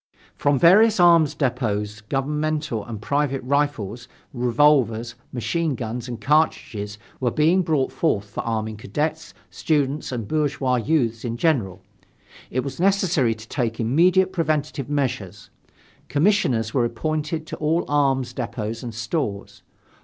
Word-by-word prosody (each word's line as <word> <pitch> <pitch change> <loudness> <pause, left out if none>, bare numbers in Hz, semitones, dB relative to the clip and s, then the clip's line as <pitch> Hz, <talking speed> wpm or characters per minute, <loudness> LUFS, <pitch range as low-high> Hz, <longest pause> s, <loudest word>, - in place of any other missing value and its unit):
From 145 -1 +2
various 210 - +6
arms 170 -4 +5
depots 105 -6 -1
governmental 150 0 -2
and 110 -1 -7
private 140 +3 -1
rifles, 125 -5 -1 0.3
revolvers, 120 -2 +2 0.2
machine 135 +6 -1
guns 120 +1 -5
and 120 -2 -6
cartridges 110 -7 0 0.2
were 125 - +1
being 160 +8 +3
brought 155 -6 0
forth 110 -12 0
for 105 - -5
arming 110 -1 -3
cadets, 150 +10 -3 0.2
students 145 -2 -1
and 115 -5 -4
bourgeois 140 -4 0
youths 120 -3 0
in 120 -1 -3
general. 110 - 0 0.7
It 130 - -1
was 135 +2 -6
necessary 180 - +2
to 110 +1 -13
take 115 -4 -2
immediate 180 +11 +3
preventive 150 -5 -1
measures. 110 -9 -3 0.6
Commissioners 135 - +1
were 130 - +2
appointed 155 +5 -2
to 160 0 -6
all 160 +3 0
arms 135 -4 +1
depots 115 -2 -4
and 120 -3 -7
stores. 105 - -3
135 Hz, 130 wpm, -23 LUFS, 115-155 Hz, 0.7 s, various